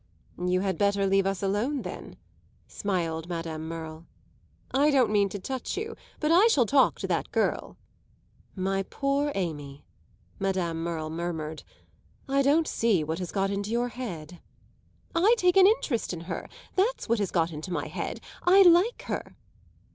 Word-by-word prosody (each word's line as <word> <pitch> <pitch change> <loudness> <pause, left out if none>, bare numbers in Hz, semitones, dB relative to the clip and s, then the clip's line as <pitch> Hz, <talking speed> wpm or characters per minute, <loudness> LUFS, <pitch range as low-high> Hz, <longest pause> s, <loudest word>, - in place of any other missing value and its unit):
"You 180 0 +1
had 190 -1 -1
better 200 -1 +2
leave 195 0 +3
us 195 0 -2
alone 220 +9 0
then," - - -8 0.5
smiled 170 -4 -2
Madame 165 -2 -4
Merle. 160 0 -7 0.6
"I 280 +3 +4
don't 260 -6 +3
mean 200 -1 +3
to 205 - -5
touch 260 +6 -4
you 445 +2 -4 0.2
but 305 0 +1
I 370 +7 +7
shall 280 - +4
talk 270 +4 +3
to - - -2
that - - -1
girl." - - -1 0.8
"My 195 0 0
poor 280 +7 -1
Amy," 145 -6 -4 0.5
Madame 185 -4 -1
Merle 160 -2 -3
murmured, 160 -2 -4 0.7
"I 275 +1 +2
don't 295 +4 +3
see 215 -8 +2
what 160 +3 -3
has 180 -2 -4
got 195 0 0
into 200 +1 -3
your 240 +2 0
head." 180 -10 -7 0.7
"I 390 +8 +5
take 360 -4 +3
an 385 0 +8
interest 300 - 0
in 170 - -6
her 170 - -6 0.3
that's 430 +7 +1
what 230 -1 +1
has 200 -3 0
got 170 -1 +1
into 155 +4 -7
my - - -2
head. - - -5 0.2
I 385 +2 +7
like 360 +6 +4
her." - - -5
195 Hz, 160 wpm, -27 LUFS, 170-275 Hz, 0.8 s, an